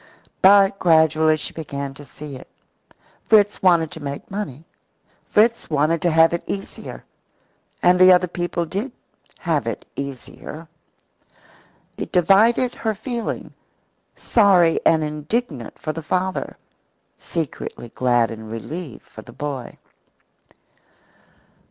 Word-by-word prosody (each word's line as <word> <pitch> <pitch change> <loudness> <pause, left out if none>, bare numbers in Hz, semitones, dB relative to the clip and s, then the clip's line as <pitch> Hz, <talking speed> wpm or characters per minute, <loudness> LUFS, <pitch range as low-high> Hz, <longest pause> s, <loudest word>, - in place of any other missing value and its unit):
But 195 +1 +6
gradually 160 -2 +4
she - - -6
began 140 -3 -5
to 145 - -12
see 145 +1 -10
it. 130 - -11 0.8
Fritz 210 -2 +4
wanted 170 -4 +3
to 170 - -9
make 140 +2 -7
money. 165 -8 -5 0.6
Fritz 230 +2 +2
wanted 155 +2 +1
to 175 - +2
have 165 +1 +5
it 170 - -1
easier. 195 0 -7 0.8
And 180 +1 +5
the 185 0 +8
other 180 0 +5
people 175 0 -3
did 200 - -4 0.4
"have - - -1
it - - -4
easier." 140 +4 -8 1.3
It - - -5
divided 215 +8 +4
her 220 -1 -2
feeling: 235 +2 -5 0.6
sorry 190 -7 +4
and 160 -1 +4
indignant 150 - -3
for 155 - -4
the 165 - -6
father, 185 +4 -2 0.6
secretly 155 -6 -5
glad 120 -1 +1
and 110 -1 -8
relieved 140 +5 -7
for 110 - -12
the 120 - -14
boy. 135 -2 -6
165 Hz, 120 wpm, -21 LUFS, 145-195 Hz, 1.3 s, the